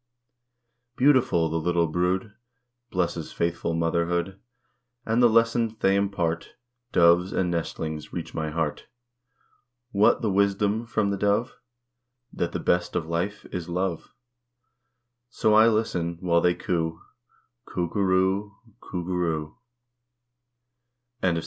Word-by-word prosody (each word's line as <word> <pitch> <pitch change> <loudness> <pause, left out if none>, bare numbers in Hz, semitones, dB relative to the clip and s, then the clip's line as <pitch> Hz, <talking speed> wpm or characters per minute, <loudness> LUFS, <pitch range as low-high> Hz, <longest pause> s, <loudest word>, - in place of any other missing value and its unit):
_" - - -45
Beautiful, 130 - +4
the 80 +1 -1
little 85 +1 +1
brood 90 +5 -1 0.6
Blesses 85 -3 -2
faithful 85 0 -1
motherhood, 85 +3 -1 0.7
And 115 +2 +2
the 120 - +6
lessons 115 0 +2
they 95 -2 +2
impart, 90 -5 -1 0.4
Doves 85 +2 +4
and 90 -2 0
nestlings, 80 -2 -4
reach 85 -2 -6
my 80 -1 -2
heart. 75 -1 -3 1.0
What 105 +2 +3
the 110 - +1
wisdom 100 +3 +1
from 110 -3 0
the 100 - -1
dove? 105 +5 +1 0.8
That 85 - -2
the - - -3
best 90 0 0
of 80 - 0
life 85 +5 -3
is 90 -1 -5
"love." 90 -1 -3 1.1
So 110 -2 +1
I 110 +1 +7
listen 90 -7 0
while 85 -2 +2
they 90 0 +3
coo 80 -2 -2 0.7
"_Coo 90 -1 -2
goo 100 - -1
roo 95 +1 +2
o - - -13
o, 105 +2 -26
Coo 90 -2 -6
goo 90 - -3
roo 80 -2 -2 1.6
o 95 - +3
o. 85 -1 0
90 Hz, 135 wpm, -25 LUFS, 85-100 Hz, 1.6 s, I